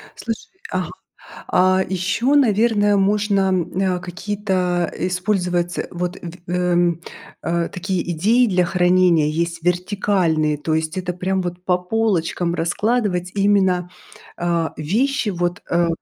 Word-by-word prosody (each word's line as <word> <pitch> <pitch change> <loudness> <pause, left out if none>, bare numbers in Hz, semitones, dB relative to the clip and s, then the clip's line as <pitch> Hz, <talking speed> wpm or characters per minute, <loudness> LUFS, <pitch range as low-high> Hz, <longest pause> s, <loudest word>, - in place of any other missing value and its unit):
Слушай, 225 -2 -5 0.2
а, - - -1 0.6
а. 185 +1 +3
Ещё, 195 +9 0
наверное, 215 -5 +3
можно, 200 -1 +2 0.2
э, 185 -1 +1
какие-то, 185 -1 -1
а, - - -7 0.2
использовать 180 -2 -1
вот, 180 +1 -3 0.3
эм, 175 -1 +1 0.4
э, 170 0 0
такие 185 -1 -3
идеи 220 +10 +3
для 180 -4 +2
хранения, 180 -3 +3
есть 170 +2 -2
вертикальные. 180 -3 +1
То 155 +2 -2
есть 160 +1 -2
это 180 -1 -2
прям 185 +1 -1
вот 175 0 -6
по 180 -1 +2
полочкам 180 -3 0
раскладывать 180 0 0
именно, 190 -3 +2 0.5
а, 170 -1 -1
вещи, 225 - 0
вот, 175 0 -2
э, 170 0 +2
180 Hz, 120 wpm, -20 LUFS, 175-200 Hz, 0.6 s, а